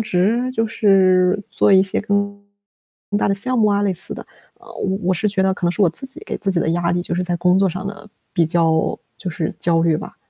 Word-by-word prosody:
职， 220 +5 0
就 225 -2 0
是 190 -2 +3
做 - - +2
一 190 0 +6
些 195 - -1
更 200 -1 -1 0.8
大 - - +1
的 195 - +2
项 255 +5 0
目 215 - +4
啊， 205 0 +1
类 195 -2 +1
似 175 - +1
的。 - - -10 0.3
呃， - - -20
我 190 0 -2
我 185 - +2
是 210 +5 0
觉 195 -1 0
得 190 - +2
可 180 -2 -3
能 - - +2
是 205 - 0
我 175 - +4
自 270 - -4
己 265 - -10
给 - - -5
自 195 -2 -1
己 185 - +1
的 160 - 0
压 170 0 0
力 175 - -1
就 175 - -4
是 180 - -1
在 175 -1 -1
工 180 +2 +2
作 195 0 +3
上 185 +2 -5
的 205 +1 -8 0.2
比 170 -3 +2
较 160 -1 +1 0.2
就 185 - -5
是 160 -1 -3
焦 165 -1 +2
虑 165 -2 +2
吧。 - - -9
190 Hz, 275 characters per minute, -19 LUFS, 175-205 Hz, 0.8 s, 一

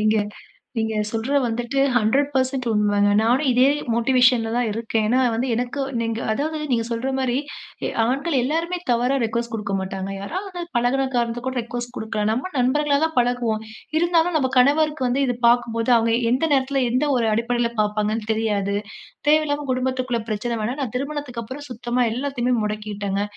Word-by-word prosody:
நீங்க 215 +1 +3 0.6
நீங்க 220 -1 -1
சொல்ற 230 +6 -1
வந்துட்டு 240 +3 -2 0.2
100% 260 +2 +1
உண்மங்க. 205 -1 +2
நானும் 245 +6 +2
இதே 250 +1 +4 0.3
மோட்டிவேஷன்ல 240 -1 +3
தான் 245 -2 +1
இருக்கேன். 225 0 -1
ஏனா, 250 +3 +3
வந்து 235 +3 -1
எனக்கு 245 +4 -2 0.2
நீங்க 230 -1 -2
அதாவது 310 +7 -2
நீங்க 230 -2 +1
சொல்ற 235 +3 -2
மாரி 255 -2 0 0.5
எ - - -1 0.2
ஆண்கள் 275 +7 -1
எல்லோருமே 330 +7 -1
தவறா 245 +3 +2
ரிக்வெஸ்ட் 235 +1 -2
குடுக்க 210 -2 -3
மாட்டாங்க. 190 0 -4
யாராவது 365 - -5
வந்து 345 -1 -5
பழகுன 250 +3 +2
காரணத்துக்கு 240 +1 -1
கூட 260 -1 -2
ரிக்வெஸ்ட் 240 +1 -6
குடுக்கலாம். 215 -1 -1
நம்ம 255 +11 -2
நண்பர்களாக 280 +3 +2
தான் 320 0 -2
பழகுவோம். 240 -3 +1 0.4
இருந்தாலும் 340 0 +2
நம்ப 265 -4 +1
கணவருக்கு 290 +1 +3
வந்து 260 +3 +1
இத 245 - 0
பார்க்கும்போது, 235 0 +1
அவங்க 230 0 +2 0.2
எந்த 255 +6 +2
நேரத்தில, 270 0 +2
எந்த 255 +5 +1
ஒரு 230 -2 +1
அடிப்படையில, 235 +1 0
பார்ப்பாங்கன்னு 210 +1 -1
தெரியாது. 205 -3 0 0.5
தேவையில்லாம 295 -1 +2
குடும்பத்துக்குள்ள 255 -1 -1
பிரச்சன 215 +3 -2
வேணாம். 250 +7 -3
நான் 250 -4 -4
திருமணத்துக்கப்புறம் 275 -1 -5
சுத்தமா 240 +1 -1
எல்லாத்தையுமே 250 0 -1
முடக்கிட்டேங்க. 205 -2 -3
245 Hz, 155 wpm, -22 LUFS, 225-270 Hz, 0.6 s, இதே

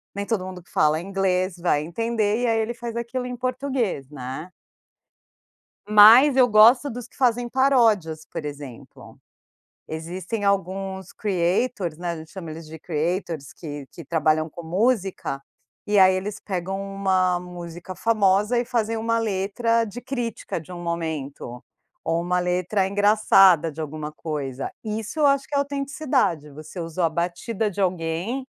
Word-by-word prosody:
nem 200 - -3
todo 205 -4 -1
mundo 185 -1 -8
que - - -25
fala 155 +1 +3
inglês 185 -1 0
vai 150 -4 +1
entender. 225 +5 -1
E - - +2
aí, 225 -1 +2
ele 225 +2 -1
faz 235 -1 -6
aquilo 235 +2 -3
em 250 - -5
português, 255 - -2
né. 145 +5 -7 1.4
Mas 225 +7 +8
eu 255 -2 +6
gosto 235 +6 +6
dos 240 0 -7
que - - -25
fazem 245 -2 +1
paródias, 225 - +2
por - - -6
exemplo. 145 -4 -10 0.7
Existem 180 +7 -5
alguns 190 -1 -1
creators, 185 -2 0
né. 175 0 -3
A 170 - -5
gente 160 0 -11
chama 175 -4 -7
eles 160 +1 -8
de 160 0 -10
creators, 165 -2 -3
que 145 -4 -7
que 170 - -10
trabalham 155 0 +1
com 170 - -10
música. 190 - 0 0.5
E 210 0 +1
aí, 185 0 +6
eles 200 +2 -4
pegam 190 0 -3
uma 190 -2 +1
música 175 0 -8
famosa 210 +1 +2
e 240 - -1
fazem 225 -2 -1
uma 230 +1 0
letra 225 +3 0
de 230 +4 -8
crítica 240 -8 -4
de 165 +3 -13
um 175 - -7
momento. 150 -7 -4 0.4
Ou 165 +1 0
uma 180 +1 0
letra 180 +2 0
engraçada 195 -5 +5
de 155 - -12
alguma 155 0 -5
coisa. 140 -4 -4
Isso 220 +6 -4
eu 300 - +4
acho 275 -1 +2
que - - -12
é - - +3
autenticidade. 275 - -1
Você 155 +5 -10
usou 165 +1 -3
a 165 - +3
batida 180 +6 -2
de 200 0 -8
alguém, 180 +8 -1
190 Hz, 155 wpm, -24 LUFS, 165-230 Hz, 1.4 s, Mas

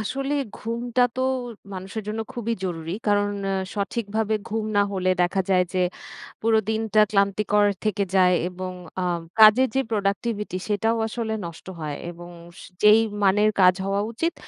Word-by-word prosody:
আসলে, 275 +6 -2 0.2
ঘুমটা 235 +2 -1
তো - - -1 0.5
মানুষের 190 +4 -6
জন্য 215 +1 -3
খুবই 235 -2 -2
জরুরি। 165 -2 -4 0.2
কারণ 205 0 +2 0.2
আ - - 0 0.2
সঠিকভাবে 220 +1 -1
ঘুম 220 0 -2
না 205 - +5
হলে 185 -1 0
দেখা 185 +2 +1
যায় 180 -1 +4
যে, 185 - -1 0.6
পুরো 225 0 +3
দিনটা 220 -1 +2
ক্লান্তিকর 205 +1 +2 0.2
থেকে 210 -2 0
যায় 180 -1 +5
এবং 185 0 -6 0.3
আ - - 0 0.4
কাজের 220 +4 +8
যে, 270 - +3
প্রোডাক্টিভিটি 205 -1 -1
সেটাও 225 +2 +1
আসলে 225 0 -3
নষ্ট 170 -1 -9
হয় 150 -2 -4 0.2
এবং 175 0 -11 0.5
যেই 210 +1 +7 0.2
মানের 205 +2 +4
কাজ 180 0 +7
হওয়া 195 +1 0
উচিত, 330 +9 -1
210 Hz, 150 wpm, -24 LUFS, 190-225 Hz, 0.6 s, কাজের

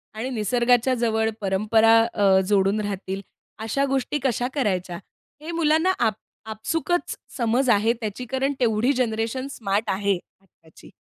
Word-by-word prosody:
आणि 230 +4 -4
निसर्गाच्या 245 +2 +2
जवळ 220 -2 +1
परंपरा 215 +3 +3 0.2
अ, 195 -2 +4
जोडून 200 +1 +2
राहतील 195 -1 -4 0.4
अशा 225 +6 -1
गोष्टी 270 +2 -1
कशा 245 -1 0
करायच्या, 185 -9 -1 0.4
हे 320 +2 -6
मुलांना 330 +2 +2
आप 225 -2 +2 0.4
आपसूकच 325 +10 -2 0.2
समज 245 +2 +1
आहे 225 +1 +3
त्याची 220 +3 -4
कारण 265 +3 -1
तेवढी 235 +2 +2
जनरेशन 240 +1 -1
स्मार्ट 210 -2 -2
आहे 200 0 +1 0.2
आत्ताची. 165 -4 -20
225 Hz, 130 wpm, -23 LUFS, 205-260 Hz, 0.4 s, अ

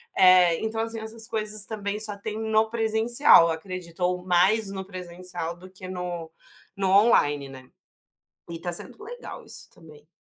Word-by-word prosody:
eh, 185 -3 +6
então 220 0 -2
assim 225 0 -3
essas 220 0 -2
coisas 215 -2 +1
também 210 -1 -4
só 215 -1 -1
tem 215 +1 -6
no 220 0 +1
presencial 225 - +4
acredito, 180 +1 -7
ou 180 0 0
mais 190 +4 +2
no 190 -1 -6
presencial 180 -2 -7
do 185 +1 -13
que 185 0 -10
no 175 -3 -5 0.5
no 195 -1 0
online, 145 -10 +3
né. 130 -1 -12 0.8
E 165 -1 -6
tá 175 0 -3
sendo 415 - -1
legal 485 +2 -9
isso - - -5
também, 155 -2 -17
190 Hz, 160 wpm, -25 LUFS, 175-220 Hz, 0.8 s, eh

